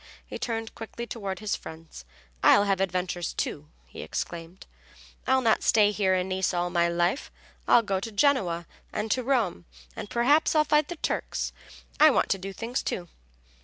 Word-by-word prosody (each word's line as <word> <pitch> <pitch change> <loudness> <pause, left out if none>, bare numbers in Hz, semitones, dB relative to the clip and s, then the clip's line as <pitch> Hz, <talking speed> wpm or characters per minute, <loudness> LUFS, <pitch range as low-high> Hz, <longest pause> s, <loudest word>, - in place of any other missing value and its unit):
He - - -7
turned 225 -1 -3
quickly 225 +1 -7
toward 200 -5 -5
his 215 +1 -2
friends. 160 - -11 0.4
"I'll 205 - +6
have 195 -2 +1
adventures, 180 -2 -2
too," 150 0 -3 0.2
he - - -10
exclaimed. 170 +2 -6 0.6
"I'll 260 0 +4
not 225 -2 +3
stay 210 -2 +4
here 195 -3 +1
in 185 0 0
Nice 190 -1 -1
all 175 0 -1
my 170 -1 +3
life; 175 +8 0 0.4
I'll 235 - +6
go 195 -3 -1
to 225 +4 -6
Genoa 200 -8 +2 0.3
and 215 0 -3
to 255 - +2
Rome, 235 - 0 0.3
and - - -7
perhaps 285 +8 +3
I'll 305 - +5
fight 300 0 +3
the 350 - -5
Turks. - - -2 0.5
I 310 - +9
want 275 - +2
to 195 - +1
do 195 +1 -6
things, 230 +5 -3
too." 175 -2 -4
200 Hz, 175 wpm, -27 LUFS, 180-235 Hz, 0.6 s, I